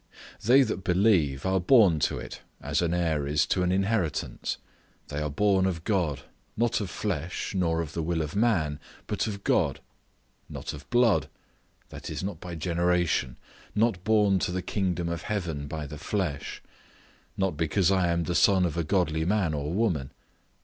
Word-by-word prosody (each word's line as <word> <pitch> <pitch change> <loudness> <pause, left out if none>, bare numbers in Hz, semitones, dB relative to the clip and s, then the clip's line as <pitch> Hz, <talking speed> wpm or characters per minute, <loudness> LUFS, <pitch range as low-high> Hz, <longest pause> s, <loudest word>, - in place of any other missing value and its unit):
They 130 +5 +6
that 95 - -3
believe 90 -7 +2
are 95 0 +2
born 95 - +5
to - - -4
it, - - -8 0.2
as 70 +4 -1
an 85 -1 0
heir 80 -5 0
is 75 +2 +2
to 95 - 0
an 90 0 +1
inheritance; 95 -5 -1 0.5
they 75 0 -3
are 75 - -1
born 95 +4 +2
of 85 -4 -3
God; 90 - 0 0.4
not 120 0 +1
of 100 - -4
flesh, 90 -3 -3
nor 85 -3 +1
of 80 -2 -6
the 85 - -2
will 80 0 -1
of 75 +5 -6
man, 85 -10 +1 0.3
but - - -1
of 100 -2 -5
God; - - +1 0.7
not - - -6
of 70 -1 -11
blood—that 120 -3 -2
is, - - -4
not 95 -4 -4
by 90 -1 -7
generation; 85 -5 0 0.4
not 105 -4 +1
born 105 -3 +3
to 90 - -1
the 90 0 -3
kingdom 90 -3 -1
of 85 -1 -3
heaven 85 -9 -3
by 75 0 -5
the 75 +1 -8
flesh; 85 -7 -3 0.7
not 95 -4 0
because 85 +4 +1
I 95 -2 +3
am 85 0 +1
the 85 - -2
son 95 0 +4
of 85 -2 -2
a 85 - +1
godly 80 -2 +1
man 95 -2 +1
or 75 +1 -3
woman. 90 - 0
90 Hz, 175 wpm, -27 LUFS, 80-100 Hz, 0.7 s, They